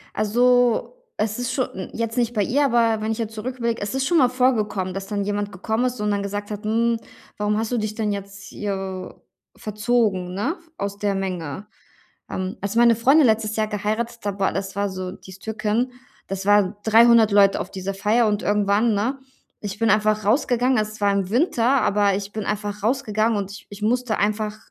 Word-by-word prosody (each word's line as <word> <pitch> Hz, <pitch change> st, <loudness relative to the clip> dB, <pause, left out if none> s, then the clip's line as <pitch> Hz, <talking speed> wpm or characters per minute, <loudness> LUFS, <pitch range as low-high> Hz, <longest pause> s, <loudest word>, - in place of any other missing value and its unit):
Also, 245 Hz, -, +2 dB, 0.2 s
es 215 Hz, +1 st, -1 dB
ist 245 Hz, -1 st, -2 dB
scho 255 Hz, -, +1 dB
n 185 Hz, -5 st, -8 dB
jetzt 230 Hz, -1 st, -3 dB
nicht 240 Hz, -1 st, +1 dB
bei 210 Hz, -, +2 dB
ihr, 275 Hz, +8 st, +2 dB
aber 230 Hz, -4 st, +2 dB
wenn 220 Hz, -, -1 dB
ich 220 Hz, -, -4 dB
jetzt 225 Hz, -1 st, -4 dB
zurücküberlege, 235 Hz, 0 st, -3 dB
es 205 Hz, +4 st, -3 dB
ist 265 Hz, 0 st, 0 dB
schon 340 Hz, 0 st, +3 dB
mal 255 Hz, -, +5 dB
vorgekommen, 220 Hz, -7 st, 0 dB
dass 195 Hz, 0 st, -5 dB
dann 205 Hz, -2 st, -2 dB
jemand 205 Hz, 0 st, -2 dB
gekommen 220 Hz, +6 st, -1 dB
ist 250 Hz, -2 st, -3 dB
und 210 Hz, 0 st, 0 dB
dann 200 Hz, -1 st, 0 dB
gesagt 205 Hz, +1 st, -4 dB
hat: 210 Hz, 0 st, -6 dB
„Hm, 230 Hz, +2 st, +1 dB, 0.4 s
warum 210 Hz, 0 st, 0 dB
hast 225 Hz, +2 st, -2 dB
du 245 Hz, -, +1 dB
dich 215 Hz, -1 st, -2 dB
denn 215 Hz, -2 st, -1 dB
jetzt 200 Hz, 0 st, -7 dB
hier 190 Hz, -2 st, -5 dB, 0.4 s
verzogen, 210 Hz, -4 st, 0 dB
ne, 260 Hz, -, -1 dB, 0.2 s
aus 200 Hz, -3 st, -4 dB
der 205 Hz, -1 st, 0 dB
Menge?” 185 Hz, -1 st, -4 dB, 0.6 s
Ähm, 185 Hz, +4 st, -3 dB
als 200 Hz, +3 st, -3 dB
meine 235 Hz, 0 st, +6 dB
Freundin 270 Hz, +6 st, +5 dB
letztes 220 Hz, -1 st, +1 dB
Jahr 215 Hz, -1 st, 0 dB
geheiratet 220 Hz, +3 st, -2 dB
hat, 200 Hz, -1 st, -2 dB
boah, 195 Hz, -, +1 dB
das 195 Hz, 0 st, -4 dB
war 200 Hz, 0 st, 0 dB
so 185 Hz, -1 st, -5 dB
die 195 Hz, -, -13 dB
ist 190 Hz, -, -12 dB
Türkin, 220 Hz, +3 st, -1 dB, 0.4 s
das 195 Hz, 0 st, -4 dB
waren 205 Hz, -1 st, +4 dB
300 225 Hz, 0 st, +6 dB
Leute 200 Hz, -1 st, +5 dB
auf -, -, -5 dB
dieser 195 Hz, +1 st, -4 dB
Feier 215 Hz, +4 st, +2 dB
und 210 Hz, 0 st, 0 dB
irgendwann, 205 Hz, +2 st, +2 dB
ne, 235 Hz, +7 st, -1 dB, 0.4 s
ich 205 Hz, -1 st, -5 dB
bin 225 Hz, 0 st, +2 dB
einfach 215 Hz, 0 st, +2 dB
rausgegangen. 245 Hz, +2 st, +2 dB
Es 215 Hz, 0 st, -3 dB
war 205 Hz, 0 st, +3 dB
im 195 Hz, -2 st, -1 dB
Winter, 245 Hz, -, +1 dB, 0.2 s
aber 200 Hz, -1 st, +2 dB
ich 200 Hz, 0 st, -6 dB
bin 215 Hz, -1 st, -4 dB
einfach 205 Hz, -1 st, -3 dB
rausgegangen 225 Hz, -2 st, +1 dB
und 195 Hz, -1 st, -4 dB
ich 210 Hz, -, -11 dB
ich 205 Hz, 0 st, -10 dB
musste 245 Hz, +1 st, 0 dB
einfach 210 Hz, +1 st, 0 dB
215 Hz, 205 wpm, -23 LUFS, 200-235 Hz, 0.6 s, meine